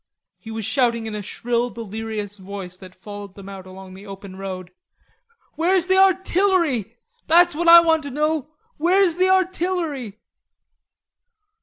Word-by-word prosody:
He 225 - -12
was 220 -1 -4
shouting 235 -1 +1
in 220 - -5
a 210 - -4
shrill 240 +4 -2
delirious 220 -2 -6
voice 190 -1 -7
that 185 0 -13
followed 205 0 -10
them 195 -1 -11
out 195 -1 -9
along 185 0 -11
the 195 +2 -12
open 195 -1 -9
road. 185 -2 -7 0.8
"Where's 355 +2 +2
the 375 +1 +3
artillery? 370 - +2 0.3
That's 345 +2 +5
what 340 +3 -2
I 340 0 +10
want 325 -1 +2
to 285 - -7
know; 300 +1 -1 0.3
where's 360 +3 +3
the 370 +2 +2
artillery?" 350 - -1
235 Hz, 145 wpm, -22 LUFS, -, 0.8 s, I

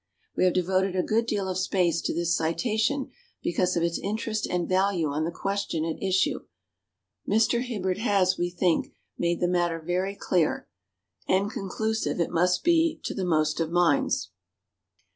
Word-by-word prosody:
We - - +2
have 180 - +2
devoted 185 +1 +1
a 180 - +1
good 230 +2 +1
deal 200 -4 -1
of 185 0 -2
space 180 -3 +1
to - - -1
this 170 0 0
citation 220 - 0 0.3
because 180 +1 +1
of 170 - +1
its 170 0 0
interest 215 +1 -2
and 175 -1 -1
value 185 -4 +1
on 150 +2 -1
the 170 - -2
question 195 -4 -2
at 165 -1 -4
issue. 190 -1 +1 0.9
Mr. 225 +3 +3
Hibberd 195 -7 -2
has, 195 -4 +2
we 175 0 -1
think, 175 -1 0 0.2
made 170 0 0
the 175 - +3
matter 175 -2 0
very 180 +4 -2
clear, 175 -5 0 0.6
and 195 +3 +2
conclusive 220 +2 -2
it 170 - 0
must 180 +2 +2
be 330 -1 +3
to - - -3
the 195 - -3
most 155 -3 +1
of 165 -1 0
minds. 170 -3 +1
185 Hz, 165 wpm, -26 LUFS, 170-200 Hz, 0.9 s, Mr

